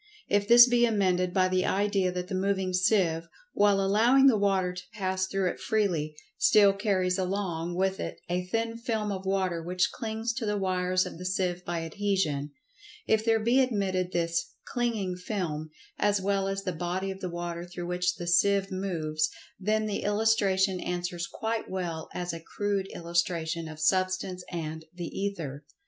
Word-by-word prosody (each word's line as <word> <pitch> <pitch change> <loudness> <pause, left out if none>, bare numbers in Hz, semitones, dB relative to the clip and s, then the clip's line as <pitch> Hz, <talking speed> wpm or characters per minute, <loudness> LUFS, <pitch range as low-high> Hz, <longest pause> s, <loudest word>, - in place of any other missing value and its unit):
If 205 0 +1
this 240 +1 +9
be 240 -1 +3
amended 185 -4 +1
by 185 0 +3
the 185 0 +1
idea 195 -2 +1
that 180 0 -4
the 195 - -6
moving 190 -1 0
seive, 180 -4 +2 0.3
while 205 -1 +4
allowing 225 +8 +4
the 265 -4 +7
water 195 -3 +1
to 180 0 -7
pass 190 -2 -1
through 195 -1 0
it - - -10
freely, 175 -9 0 0.2
still 200 -2 +6
carries 195 -2 0
along 180 -3 -2
with 190 +1 0
it - - -4
a 180 +1 -1
thin 225 +3 -1
film 220 -3 -2
of 190 -1 -5
water 185 -3 0
which 180 +2 0
clings 225 +1 -3
to 240 - -2
the 210 0 0
wires 185 -1 +1
of - - -8
the - - -6
seive 180 -1 -1
by 170 -1 -3
adhesion—if 195 - -2
there 225 -1 +3
be 235 +4 +3
admitted 195 -8 0
this 170 -1 -1
"clinging 220 -7 -1
film" 175 -6 -3 0.3
as 205 -1 +2
well 195 0 0
as 195 0 -2
the 185 - -1
body 180 +4 -2
of 190 - -8
the 185 - -4
water 170 0 -4
through 175 0 -7
which 180 0 0
the 175 - -6
seive 195 +3 +3
moves—then 185 +4 -2
the 210 -2 -2
illustration 205 -3 +2
answers 175 -1 -3
quite 225 0 -3
well 175 -4 -4
as 175 -1 -3
a 165 - -5
crude 200 +3 -2
illustration 170 -1 -1
of 155 -1 -9
Substance 185 +2 0
and 160 -2 -5
"The 175 -1 -5
Ether." 165 -8 -4
185 Hz, 170 wpm, -28 LUFS, 175-205 Hz, 0.3 s, this